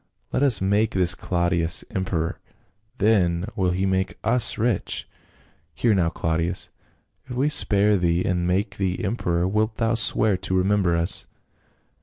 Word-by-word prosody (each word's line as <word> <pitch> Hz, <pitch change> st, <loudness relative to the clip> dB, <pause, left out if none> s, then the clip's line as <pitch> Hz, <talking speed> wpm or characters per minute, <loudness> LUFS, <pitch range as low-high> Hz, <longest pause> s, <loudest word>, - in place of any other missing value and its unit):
Let -, -, -1 dB
us 130 Hz, -9 st, +4 dB
make 100 Hz, +3 st, +1 dB
this 90 Hz, -1 st, +2 dB
Claudius 85 Hz, -1 st, 0 dB
emperor, 90 Hz, -3 st, -3 dB, 0.6 s
then 95 Hz, -5 st, +1 dB
will 95 Hz, -4 st, 0 dB
he 90 Hz, +2 st, -1 dB
make 95 Hz, -2 st, -1 dB
us 115 Hz, +1 st, +2 dB
rich. 115 Hz, -4 st, -1 dB, 0.7 s
Hear 115 Hz, +7 st, +1 dB
now, 90 Hz, -4 st, +1 dB
Claudius, 80 Hz, +1 st, -2 dB, 0.6 s
if 125 Hz, -, -6 dB
we 135 Hz, +4 st, +1 dB
spare 105 Hz, -6 st, +3 dB
thee 85 Hz, 0 st, 0 dB
and 90 Hz, -1 st, -1 dB
make 95 Hz, +2 st, -1 dB
thee 95 Hz, +2 st, -2 dB
emperor 90 Hz, -5 st, -1 dB
wilt 105 Hz, +3 st, -1 dB
thou 115 Hz, 0 st, 0 dB
swear 110 Hz, -3 st, +3 dB
to 95 Hz, +1 st, -2 dB
remember 95 Hz, -2 st, +1 dB
us?" 85 Hz, +1 st, +1 dB
95 Hz, 145 wpm, -23 LUFS, 85-105 Hz, 0.7 s, us